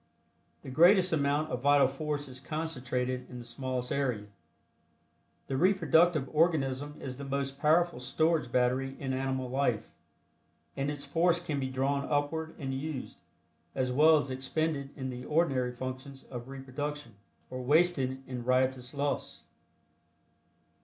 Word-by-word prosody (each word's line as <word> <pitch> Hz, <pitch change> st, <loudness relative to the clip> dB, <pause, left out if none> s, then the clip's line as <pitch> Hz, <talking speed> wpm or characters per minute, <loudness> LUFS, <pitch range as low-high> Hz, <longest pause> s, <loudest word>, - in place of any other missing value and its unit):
The 130 Hz, -, -7 dB
greatest 180 Hz, +5 st, +6 dB
amount 145 Hz, +1 st, +1 dB
of 125 Hz, -1 st, -2 dB
vital 140 Hz, 0 st, +5 dB
force 145 Hz, +1 st, -3 dB
is 130 Hz, -1 st, -9 dB
concentrated 130 Hz, -4 st, -3 dB
in 125 Hz, -, -8 dB
the 120 Hz, -, -8 dB
smallest 125 Hz, +1 st, -3 dB
area. 125 Hz, -7 st, -1 dB, 1.2 s
The 135 Hz, -, -3 dB
reproductive 170 Hz, -4 st, +4 dB
organism 145 Hz, -3 st, +1 dB
is 130 Hz, -1 st, -6 dB
the 140 Hz, -, -7 dB
most 140 Hz, 0 st, -3 dB
powerful 165 Hz, 0 st, +3 dB
storage 155 Hz, +1 st, +1 dB
battery 130 Hz, +2 st, +1 dB
in 135 Hz, -1 st, -2 dB
animal 130 Hz, 0 st, -1 dB
life, 125 Hz, -3 st, 0 dB, 0.8 s
and 140 Hz, +1 st, -1 dB
its 145 Hz, -1 st, -5 dB
force 170 Hz, +4 st, +2 dB
can 155 Hz, -5 st, -3 dB
be 130 Hz, -1 st, -2 dB
drawn 140 Hz, +2 st, 0 dB
upward 155 Hz, +2 st, -1 dB
and 135 Hz, -3 st, -4 dB
used, 135 Hz, -, -5 dB, 0.5 s
as 130 Hz, -1 st, 0 dB
well 155 Hz, +4 st, +6 dB
as 145 Hz, -2 st, -2 dB
expended 140 Hz, +2 st, -2 dB
in 130 Hz, -2 st, -4 dB
the 125 Hz, 0 st, -7 dB
ordinary 135 Hz, -6 st, +1 dB
functions 130 Hz, +2 st, -7 dB
of 120 Hz, -1 st, -6 dB
reproduction, 135 Hz, -1 st, -5 dB, 0.4 s
or 130 Hz, 0 st, -4 dB
wasted 135 Hz, -2 st, +2 dB
in 125 Hz, -2 st, -5 dB
riotous 130 Hz, +1 st, +1 dB
lust. 145 Hz, 0 st, -2 dB
135 Hz, 140 wpm, -30 LUFS, 130-150 Hz, 1.2 s, greatest